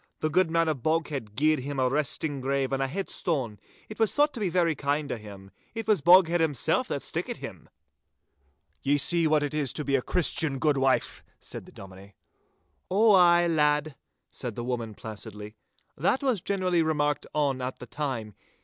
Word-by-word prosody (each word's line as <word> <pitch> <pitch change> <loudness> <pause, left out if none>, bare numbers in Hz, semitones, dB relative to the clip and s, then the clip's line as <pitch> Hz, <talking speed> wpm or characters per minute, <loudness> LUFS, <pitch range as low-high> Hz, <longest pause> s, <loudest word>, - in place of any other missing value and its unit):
The 155 - 0
good 185 +1 +3
man 165 0 +2
of 155 -2 0
Boghead 150 -8 -2
gied 155 +2 +2
him 140 +1 -4
a 130 - +3
resting 145 +1 -1
grave 135 0 -1
and 135 - 0
a 135 - +1
headstone. 140 - -3 0.3
It 215 - -10
was 220 -2 +2
thought 295 0 +3
to 240 - -6
be 200 -4 0
very 170 -2 +2
kind 145 0 -2
o' - - -1
him. 100 -2 -12 0.2
It 225 -1 -4
was 210 -7 +3
Boghead 175 +1 +6
himsel' 155 -6 +1
that - - -4
stickit - - -3
him.' - - -10 1.1
'Ye 145 +1 +2
see 165 +3 +3
what 155 -1 +2
it 145 - -3
is 145 -4 -1
to 150 - -4
be 140 - +1
a 135 - +2
Christian, 160 -2 0
good 140 +1 +1
wife!' 135 -1 0 0.2
said - - -9
the - - -14
Dominie. 95 +1 -13 0.7
'Ow 215 +4 +4
ay, 175 -2 +6
lad,' 150 -2 +1 0.4
said 120 -4 -5
the 120 - -4
woman, 120 -3 -4
placidly. 105 -1 -8 0.4
'That 185 - 0
was 250 -9 +1
generally 185 -3 0
remarked 150 -2 0
on 140 -3 0
at 125 +1 -4
the - - -9
time. 125 -6 -4
150 Hz, 185 wpm, -27 LUFS, 130-170 Hz, 1.1 s, Boghead